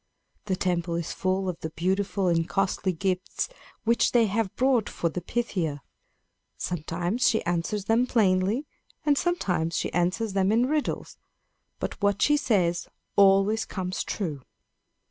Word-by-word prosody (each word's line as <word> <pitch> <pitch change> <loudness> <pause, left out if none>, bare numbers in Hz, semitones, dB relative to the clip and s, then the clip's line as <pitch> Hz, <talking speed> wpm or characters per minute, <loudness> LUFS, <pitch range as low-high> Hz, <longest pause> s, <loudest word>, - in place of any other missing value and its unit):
The 190 -2 0
temple 175 -2 -1
is 170 -1 -3
full 190 0 0
of 180 -3 -3
the 160 - -4
beautiful 190 +4 -1
and 165 -1 +1
costly 195 -1 0
gifts 185 - -2 0.3
which 235 +1 +2
they 235 -2 +5
have 210 -1 -1
brought 255 -3 +2
for 170 - -1
the 175 +3 -4
Pythia. 175 - -2 0.7
Sometimes 175 +8 0
she 220 - 0
answers 175 +4 -1
them 230 +3 +3
plainly, 205 +3 +2 0.4
and 295 -1 +4
sometimes 180 - 0
she - - -2
answers 185 +5 0
them 195 0 +2
in 235 +3 +3
riddles; 300 +1 -2 0.6
but - - -4
what 200 -1 +2
she 295 - +4
says 180 - +1 0.3
always 200 +2 +5
comes 185 -1 -3
true." 155 -9 -3
190 Hz, 145 wpm, -27 LUFS, 175-225 Hz, 0.7 s, they